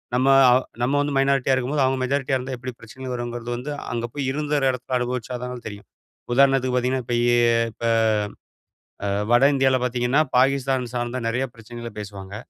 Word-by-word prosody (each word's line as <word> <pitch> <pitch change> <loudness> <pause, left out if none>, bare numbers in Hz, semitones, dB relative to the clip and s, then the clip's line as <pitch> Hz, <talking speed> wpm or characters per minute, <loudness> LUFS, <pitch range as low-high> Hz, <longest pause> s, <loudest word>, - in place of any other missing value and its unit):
நம்ம 130 +2 +2 0.2
அவு 125 +1 +4 0.2
நம்ம 125 +3 +1
வந்து 145 -1 -2
மைனாரிட்டியா 135 -1 +2
இருக்கும்போது, 135 +3 0
அவுங்க 130 0 0
மெஜாரிட்டியா 135 0 0
இருந்தா 130 +1 -5
எப்படி 130 +1 -6
பிரச்சனைகள் 130 +3 -8
வருங்கிறது 120 0 -5
வந்து, 125 +5 -5 0.2
அங்க 120 0 -2
போய் 140 -2 -2
இருந்த 150 +1 -2
ஒரு 135 - +2
இடத்த 125 0 -3
அனுபவிச்சாதான் 125 0 -4
தெரியும். 100 -1 -9 0.5
உதாரணத்துக்கு 135 -1 +3
பார்த்தீங்கன்னா, 125 0 0
இப்ப 120 - -1
இ - - +2 0.5
இப்ப 115 - -6 1.2
அ - - 0 0.2
வட 120 +3 +6
இந்தியால 130 -1 +3
பாத்தீங்கன்னா, 125 +3 +1 0.2
பாகிஸ்தான் 130 -1 +1
சார்ந்த 120 0 -2
நிறைய 125 +3 -1
பிரச்சனைகள 115 0 -9
பேசுவாங்க. 100 -1 -8
125 Hz, 165 wpm, -23 LUFS, 120-135 Hz, 1.2 s, வட